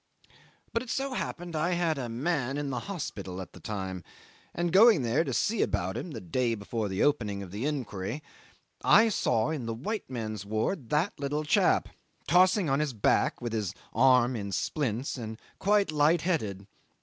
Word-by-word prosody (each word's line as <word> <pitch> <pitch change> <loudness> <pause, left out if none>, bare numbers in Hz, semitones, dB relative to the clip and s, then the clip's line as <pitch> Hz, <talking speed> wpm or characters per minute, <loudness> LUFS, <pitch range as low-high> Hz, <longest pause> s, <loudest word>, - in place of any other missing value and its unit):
'But 230 - +1
it 255 - -9
so 270 +1 -1
happened 175 -7 -4
that 155 - -1
I 175 +3 +1
had 170 -4 0
a 120 -3 -4
man 135 +2 -1
in 145 -1 -2
the 125 - -2
hospital 100 - -5
at 95 -2 -8
the - - -12
time, 95 -3 -5 0.5
and 175 0 -2
going 205 - +7
there 120 +7 +2
to 140 - -3
see 210 - +1
about 95 +2 0
him 180 - -4
the 150 - -6
day 115 +7 0
before 105 +1 -3
the 95 +1 0
opening 105 -9 +1
of 90 - -10
the 110 +8 -2
Inquiry, 125 -2 -3 0.6
I 225 +2 +6
saw 120 - +1
in 135 -7 -3
the 115 - -2
white 210 - -4
men's 110 -5 -4
ward 110 - -2
that 155 +7 +1
little 145 +2 -1
chap 150 - +3 0.4
tossing 185 +1 +4
on 135 0 +2
his 150 -3 -1
back, 105 - +1
with 120 -2 -3
his 105 -4 -2 0.2
arm 125 0 +4
in 100 -3 -4
splints, 130 - -2
and 110 -1 -6 0.2
quite 200 -3 +3
light 155 +2 +3
headed. 105 - -1
130 Hz, 185 wpm, -29 LUFS, 110-165 Hz, 0.6 s, going